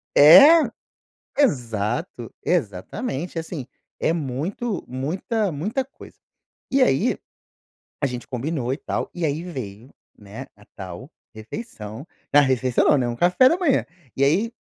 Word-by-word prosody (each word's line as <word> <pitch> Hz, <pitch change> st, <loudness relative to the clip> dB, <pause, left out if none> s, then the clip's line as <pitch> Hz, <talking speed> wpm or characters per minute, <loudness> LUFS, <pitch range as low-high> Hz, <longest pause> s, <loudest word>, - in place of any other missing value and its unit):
É! 280 Hz, -, +9 dB, 0.8 s
Exato. 120 Hz, -, -1 dB
Exatamente, 170 Hz, -, -2 dB
e -, -, 0 dB
assim, 160 Hz, -5 st, -6 dB, 0.3 s
é 160 Hz, -, +2 dB
muito 165 Hz, -, -3 dB
muita 180 Hz, -, -2 dB
muita 210 Hz, -, -2 dB
coisa. 270 Hz, -, -15 dB, 0.6 s
E 270 Hz, 0 st, +4 dB
aí, 135 Hz, -, +2 dB, 0.9 s
a 140 Hz, -, +2 dB
gente 125 Hz, 0 st, -7 dB
combinou 130 Hz, 0 st, -3 dB
e 135 Hz, -, -4 dB
tal -, -, -4 dB
e 175 Hz, -, -1 dB
aí 155 Hz, +3 st, -2 dB
veio, 125 Hz, -, -8 dB, 0.3 s
né, 105 Hz, +4 st, -10 dB
a 105 Hz, -, -19 dB
tal 95 Hz, -, -9 dB, 0.2 s
refeição 110 Hz, -, -8 dB, 0.3 s
na 145 Hz, -, +8 dB
refeição, 130 Hz, -2 st, +1 dB
não, 150 Hz, -, +5 dB
né, 125 Hz, -2 st, 0 dB
um 120 Hz, -, -3 dB
café 180 Hz, -, +4 dB
da 335 Hz, -, +1 dB
manhã. 335 Hz, -8 st, +1 dB, 0.3 s
E 135 Hz, -, +1 dB
aí 185 Hz, +12 st, +2 dB
145 Hz, 140 wpm, -23 LUFS, 120-185 Hz, 0.9 s, É